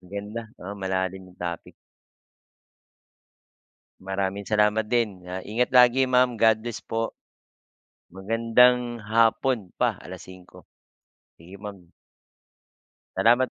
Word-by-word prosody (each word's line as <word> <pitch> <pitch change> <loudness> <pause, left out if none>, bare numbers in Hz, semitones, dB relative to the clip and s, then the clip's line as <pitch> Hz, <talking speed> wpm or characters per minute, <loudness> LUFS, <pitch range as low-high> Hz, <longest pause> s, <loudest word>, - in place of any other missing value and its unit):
Maganda, 105 +4 -7
oo, 95 +3 -8
malalim 95 0 -3
yung 90 - -19
topic. 85 -1 -6 2.3
Maraming 95 +1 -3
salamat 105 +1 +2
din. 105 -6 -1
Ah, 90 +1 -5
ingat 120 +6 -1
lagi 125 +1 +6
ma'am 125 -2 +2
godlbess 110 +1 +1
po. 115 0 -3 0.9
Magandang 115 +5 +2
hapon 115 -1 +2
pa - - +2
alas - - -10
5:00. 90 -1 -15 0.8
Sige 90 +4 -12
ma'am. 100 -4 -10 1.3
Salamat. 120 +3 +4
105 Hz, 95 wpm, -25 LUFS, 95-115 Hz, 2.3 s, lagi